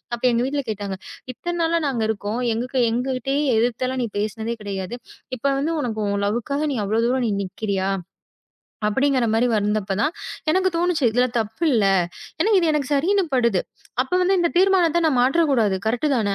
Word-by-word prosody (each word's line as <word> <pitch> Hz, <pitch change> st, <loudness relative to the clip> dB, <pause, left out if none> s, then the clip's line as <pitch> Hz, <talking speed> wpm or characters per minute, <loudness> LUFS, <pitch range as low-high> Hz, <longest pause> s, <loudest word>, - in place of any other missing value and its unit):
அப்போ 240 Hz, -, -4 dB
எங்க 235 Hz, 0 st, +1 dB
வீட்டுல 285 Hz, 0 st, -2 dB
கேட்டாங்க. 200 Hz, -2 st, -4 dB, 0.4 s
"இத்தன 345 Hz, +6 st, -4 dB
நாளா 335 Hz, +1 st, +2 dB
நாங்க 245 Hz, -4 st, -2 dB
இருக்கோம். 220 Hz, +3 st, -2 dB
எங்களுக்கு 250 Hz, +3 st, -1 dB
எங்ககிட்டே 260 Hz, +2 st, -1 dB, 0.2 s
எதிர்த்தலா 245 Hz, +3 st, 0 dB
நீ -, -, -1 dB
பேசுனதே 220 Hz, +2 st, -3 dB
கெடயாது. 200 Hz, +2 st, -4 dB, 0.4 s
இப்ப 275 Hz, +4 st, 0 dB
வந்து 275 Hz, -, -1 dB, 0.2 s
உனக்கு 225 Hz, -5 st, -3 dB
உன் 200 Hz, 0 st, -1 dB
லவ்க்காக 240 Hz, +8 st, -1 dB
நீ -, -, -2 dB
அவ்ளோ 215 Hz, +3 st, 0 dB
தூரம் 255 Hz, +1 st, +1 dB
நீ 225 Hz, -, +1 dB
நிக்கறியா?" 195 Hz, 0 st, -2 dB, 1.0 s
அப்டிங்கிற 265 Hz, +3 st, +2 dB
மாரி 235 Hz, +2 st, +3 dB
வந்தப்பதான் 210 Hz, +4 st, 0 dB, 0.4 s
எனக்குத் 375 Hz, +1 st, +2 dB
தோணுச்சு. 335 Hz, -5 st, +1 dB
இதுல 245 Hz, +2 st, +3 dB
தப்பு 220 Hz, +8 st, -3 dB
இல்ல. 220 Hz, -5 st, +3 dB, 0.5 s
எனக்கு 405 Hz, +4 st, +4 dB
இது 335 Hz, -2 st, +2 dB
எனக்குச் 295 Hz, -2 st, -1 dB
சரின்னு 375 Hz, +8 st, +2 dB
படுது. 235 Hz, -7 st, +3 dB, 0.4 s
அப்ப 260 Hz, -, -6 dB
வந்து 380 Hz, +2 st, +3 dB
இந்தத் 345 Hz, 0 st, 0 dB
தீர்மானத்த 360 Hz, -3 st, +4 dB
நான் 265 Hz, -5 st, +1 dB
மாற்றக் 295 Hz, +5 st, +3 dB
கூடாது. 220 Hz, -7 st, +2 dB
கரெக்ட் 240 Hz, +7 st, +1 dB
தானே? 205 Hz, -4 st, 0 dB
250 Hz, 170 wpm, -22 LUFS, 215-300 Hz, 1.0 s, எனக்கு